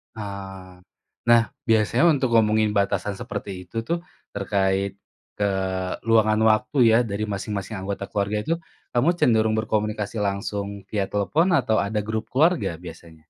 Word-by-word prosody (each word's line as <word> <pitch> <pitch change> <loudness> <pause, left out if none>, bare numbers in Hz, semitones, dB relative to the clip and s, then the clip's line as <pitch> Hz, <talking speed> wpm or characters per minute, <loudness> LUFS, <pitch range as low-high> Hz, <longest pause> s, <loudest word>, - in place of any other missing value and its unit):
Ah, 95 -3 -8 0.5
nah 115 -2 +5 0.2
biasanya 110 +9 +4
untuk 140 -5 +3
ngomongin 110 -1 +3
batasan 100 0 0
seperti 90 -3 -6
itu - - -22
tuh 170 0 0 0.3
terkait 100 -1 0 0.4
keluangan 100 +3 +1
waktu 110 +7 -1
ya 110 - +6
dari 105 +2 -2
masing-masing 100 +1 -4
anggota 100 0 -4
keluarga 105 0 -1
itu, 160 +10 -1 0.4
kamu 130 +8 +4
cenderung 110 -2 +3
berkomunikasi 105 -1 -2
langsung 100 0 -2 0.2
via 105 -2 -1
telepon 145 - +1
atau 110 -3 0
ada 105 +1 -1
grup 110 0 -3
keluarga 150 - +2
biasanya? 85 -2 -12
105 Hz, 130 wpm, -24 LUFS, 100-110 Hz, 0.5 s, ya